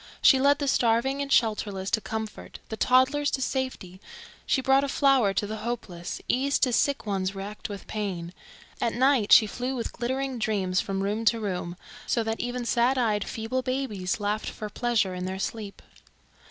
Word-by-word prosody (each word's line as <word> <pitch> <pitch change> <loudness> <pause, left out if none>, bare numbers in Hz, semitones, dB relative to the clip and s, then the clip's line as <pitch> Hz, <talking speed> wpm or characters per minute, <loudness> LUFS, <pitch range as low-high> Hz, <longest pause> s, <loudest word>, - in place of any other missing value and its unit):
She 265 - +6
led 285 +2 +4
the 285 -1 -2
starving 255 +3 +2
and 280 - -3
shelterless 205 -5 +1
to 220 - +2
comfort, 220 0 -6
the 220 - -3
toddlers 260 +5 +3
to - - -2
safety; 255 -9 -3 0.5
she - - +2
brought 270 +1 +3
a - - 0
flower 270 -8 +3
to - - +1
the 215 +1 -5
hopeless, 210 -6 -5
ease 275 +3 +2
to 250 -3 +1
sick 280 +2 +1
ones 195 -2 -1
racked 205 +3 -6
with 200 -1 -7
pain; 185 -5 -4 0.5
at 230 - 0
night 255 -4 +3
she 220 - +9
flew 250 +5 -3
with 235 - -4
glittering 260 +1 -2
dreams 195 -4 0
from 195 0 -3
room 210 +3 -1
to 230 +1 +3
room, 180 -4 -4 0.3
so 230 - +1
that 225 0 -3
even 245 0 -3
sad 245 +3 +2
eyed 215 -4 +1
feeble 225 +3 -2
babies 255 -9 -2
laughed 210 +1 -1
for 215 -1 -7
pleasure 230 -6 0
in 180 0 -4
their 190 +1 -3
sleep. 205 +1 -5
225 Hz, 180 wpm, -27 LUFS, 200-260 Hz, 0.5 s, she